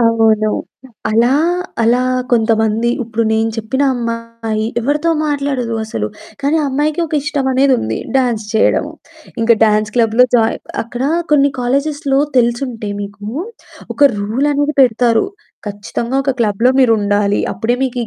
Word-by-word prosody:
అవును. 225 -2 +3 0.6
అలా 230 +3 +3 0.5
అలా 235 +2 +3 0.3
కొంతమంది 225 0 +2
ఇప్పుడు 230 0 -2
నేను 220 +1 +1
చెప్పిన 225 +5 -2
అమ్మాయి 230 -2 -3 0.2
ఎవరితో 295 +7 0 0.2
మాట్లాడదు 275 -5 -2
అసలు, 110 - -3 0.3
కానీ 285 +3 +1
ఆ - - -1
అమ్మాయికి 295 +4 0
ఒక 310 - -5
ఇష్టం 285 -3 -2
అనేది 265 +1 +3
ఉంది, 110 0 -3 0.2
డ్యాన్స్ 240 -5 0
చేయడము. 300 +7 +2 0.5
ఇంకా 230 +1 +5
డ్యాన్స్ 215 0 +1
క్లబ్‌లో 230 +2 +4
జాయిన్ 225 -1 0 0.2
అక్కడ 240 +2 -6 0.3
కొన్ని 285 -1 +4
కాలేజెస్‌లో 275 +2 0 0.2
తెలిసుంటే 235 -3 -1
మీకు 200 0 -9 0.7
ఒక - - -14 0.2
రూల్ 230 +8 0
అనేది 290 +1 0
పెడతారు. 235 - +2 0.4
ఖచ్చితంగా 215 +5 -4
ఒక 275 - +1
క్లబ్‌లో 225 +3 +2
మీరు 250 -3 +5
ఉండాలి 205 0 +1
అప్పుడే 225 +5 -1
మీకు 255 -1 -3
235 Hz, 135 wpm, -16 LUFS, 220-270 Hz, 0.7 s, ఇంకా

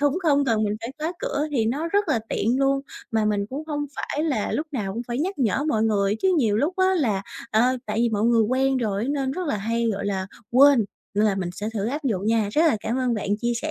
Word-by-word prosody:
cũng 290 +4 +2
không 285 -3 +3
cần 225 -4 +1
mình 210 0 -1
phải 230 +3 -6
khóa 320 +3 -2
cửa - - -1
thì 235 -6 +1
nó 290 +8 -1
rất 405 0 +1
là 245 - +2
tiện 240 +5 0
luôn. 275 0 +2 0.3
Mà 220 -1 +2
mình 205 -1 0
cũng 280 +4 -4
hông 290 -2 -2
phải 300 +2 -2
là 255 -10 -1
lúc 310 - -1
nào 205 -7 -2
cũng 230 +4 -4
phải 240 +2 -2
nhắc 370 +4 -2
nhở 265 +2 +1
mọi 220 -6 +1
người 205 -2 +2
chứ 375 -1 +3
nhiều 215 -6 +2
lúc 305 +10 0
á 375 0 +3
là, 215 - 0 0.3
ờ, 220 - +3 0.3
tại 210 +1 -3
vì 235 0 +3
mọi 210 -1 -1
người 235 -1 +4
quen 265 +4 +1
rồi 210 -5 -1
á 260 - -3
nên 270 -2 -1
rất 365 +2 -4
là 250 - 0
hay, 230 +3 -1
gọi 200 0 -3
là, 190 -2 -2 0.2
quên 265 -2 +6 0.3
nên 210 +1 +3
là 205 -2 +3
mình 185 -2 -3
sẽ 205 +4 -4
thử 205 0 -1
áp 290 +5 -3
dụng 205 -6 -1
nha. 220 -2 +2
Rất 310 - +3
là 305 - +3
cảm 235 +3 -2
ơn 250 -2 +1
bạn 205 -2 -3
chia 240 0 0
sẻ 310 - -2
240 Hz, 270 wpm, -24 LUFS, 215-290 Hz, 0.3 s, quên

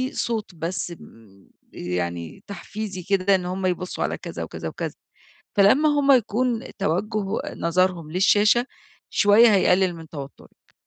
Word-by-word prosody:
صوت 220 -6 -3
بس 170 +2 -3
آمم، 110 - -15 0.2
يعني 85 -2 -4
تحفيزي 200 0 -6
كده 195 +1 +2
إن 180 -1 -2
هم 185 +1 -3
يبصوا 180 0 -2
على - - -2
كذا - - -6
وكذا - - -6
وكذا. - - -5 0.6
فلمّا 235 +10 +5
هم 290 -1 +4
يكون 240 0 +1 0.2
توجه 200 +3 -1 0.3
نظرهم 170 -2 0
للشاشة، 210 +6 +4 0.5
شوية 210 +2 +6
هيقلل 185 -1 +3
من 165 -1 -11
توترِك. 140 -3 -11
190 Hz, 125 wpm, -23 LUFS, 170-215 Hz, 0.6 s, شوية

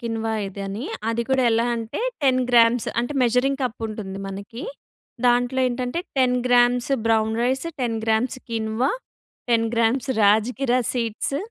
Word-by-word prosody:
Quinoa 225 -2 -2
ఇది 195 +1 -7
అని. 205 +6 -5 0.3
అది 235 +1 -1
కూడా 265 -1 +2
ఎలా 230 +1 +2
అంటే, 225 - -5 0.2
10 255 -2 +3
గ్రామ్స్ 235 0 +4
అంటే, 245 +5 -3
మెజరింగ్ 260 +4 +1
కప్ 245 -2 -3
ఉంటుంది 200 -3 -6
మనకి. 200 +6 -8 0.6
దాంట్లో 245 +2 +2
ఏంటంటే, 250 +6 -2 0.2
10 250 -1 +3
grams 245 +1 +3 0.2
brown 220 -1 +2
rice, 265 +6 0
10 235 -2 -1
grams 225 +3 0
quinoa, 225 +3 0 0.6
10 230 -1 +3
grams 235 +4 +1
rajgira 240 +5 +3
seeds, 235 +3 -2
235 Hz, 140 wpm, -23 LUFS, 225-250 Hz, 0.6 s, గ్రామ్స్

